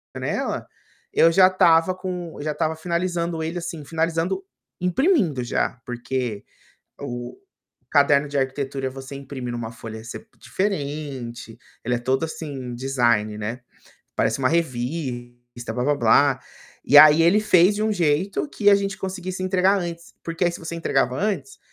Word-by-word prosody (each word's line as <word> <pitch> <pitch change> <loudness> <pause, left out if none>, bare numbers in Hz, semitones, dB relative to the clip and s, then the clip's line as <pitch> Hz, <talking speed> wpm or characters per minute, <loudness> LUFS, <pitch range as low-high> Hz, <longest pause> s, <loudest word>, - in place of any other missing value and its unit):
janela, - - -3 0.5
eu 165 - +5
já 185 +2 +7
estava 180 -1 +4
com 180 -3 -5
eu - - -5
já 155 - -1
estava 160 +1 -1
finalizando 170 0 -2
ele 165 +2 -3
assim, 170 -2 -6
finalizando, 165 +4 -1 0.4
imprimindo 180 - +2
já 120 0 -1
porque 120 -3 -4 0.5
o 120 - -6 0.5
caderno 145 0 +4
de 145 - -2
arquitetura 135 0 -2
você 135 +1 -9
imprime 130 -3 -6
em - - -4
uma 115 -1 -5
folha 110 -1 -9
se 120 - -8
diferente, 140 - -4 0.3
ele 125 0 +1
é - - -2
todo 130 +4 0
assim, 140 -6 -6
design, 120 -5 +1
né, 115 +4 -4 0.5
parece 115 +4 +1
uma 130 - +2
revista, 120 -5 -3
"blá-blá-blá". 135 +1 +3 0.5
E 145 - +8
aí, 155 +2 +9
ele 180 +5 +5
fez 195 -1 +5
de 210 - -1
um 220 - +1
jeito 175 - 0
que 205 -6 +3
a 200 - +7
gente 195 0 -2
conseguisse 185 -1 -5
entregar 185 +1 +3
antes, 170 -1 -7
porque 165 +2 -1
aí, 175 - +2
se - - -6
você 165 0 -6
entregava 135 -6 0
antes, 210 - -2
150 Hz, 150 wpm, -23 LUFS, 125-175 Hz, 0.5 s, aí